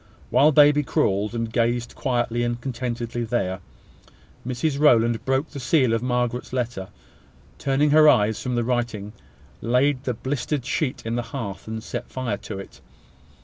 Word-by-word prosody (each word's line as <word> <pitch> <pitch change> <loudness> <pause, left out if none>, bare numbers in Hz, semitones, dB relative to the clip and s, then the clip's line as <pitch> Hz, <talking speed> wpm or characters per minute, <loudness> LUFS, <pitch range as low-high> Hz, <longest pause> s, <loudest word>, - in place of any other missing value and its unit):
While 150 +3 +5
baby 150 0 +6
crawled, 105 -4 0
and 115 -1 -3
gazed 120 0 0
quietly 120 -2 -1
and 120 0 -1
contentedly 120 -2 -4
there, 100 -5 -1 0.9
Mrs 135 +3 -1
Rowland 120 -6 +4
broke 135 +4 0
the 140 - -7
seal 130 -2 +2
of 115 - 0
Margaret's 125 -1 -1
letter, 120 -7 -3 0.7
turning 140 +2 +2
her 155 0 +7
eyes 105 -3 +3
from 125 -1 -2
the 120 - +1
writing, 115 -4 -2 0.5
laid 130 +3 +1
the 125 - -1
blistered 130 +2 -3
sheet 140 -1 -2
in 115 +1 -2
the - - 0 0.2
hearth, 100 -7 -6
and 110 0 -5
set - - -6
fire 125 -6 -3
to 100 0 -7
it. 95 - -11
120 Hz, 155 wpm, -24 LUFS, 115-135 Hz, 0.9 s, her